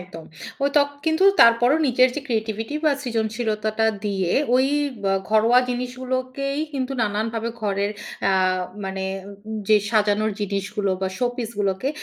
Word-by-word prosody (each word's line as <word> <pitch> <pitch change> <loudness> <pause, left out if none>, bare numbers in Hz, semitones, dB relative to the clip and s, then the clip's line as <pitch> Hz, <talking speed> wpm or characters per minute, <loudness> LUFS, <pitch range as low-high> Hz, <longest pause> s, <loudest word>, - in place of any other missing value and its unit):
একদম। 180 -3 -10 0.4
ঐত, 280 +1 0 0.3
কিন্তু 320 +3 +2 0.2
তারপরও 235 +4 +6
নিজের 255 0 +4
যে - - -1
ক্রিয়েটিভিটি 225 +1 -2
বা 305 - +5
সৃজনশীলতাটা 220 -2 -1 0.2
দিয়ে 190 -4 -1 0.2
ওই 260 +1 +4 0.4
ব - - -8 0.3
ঘরোয়া 225 +3 +5
জিনিসগুলোকেই 255 +3 -3
কিন্তু 270 -1 -2
নানানভাবে 220 +2 -1
ঘরের 200 -1 0 0.4
আ - - +3 0.5
মানে 190 0 -4 0.6
যে 215 - +7
সাজানোর 215 -1 +2
যে 210 - -1
ডিসগুলো 200 0 -2
বা 190 - +1
শোপিস 245 -2 -2
গুলোকে 200 +4 0
225 Hz, 130 wpm, -23 LUFS, 205-255 Hz, 0.6 s, যে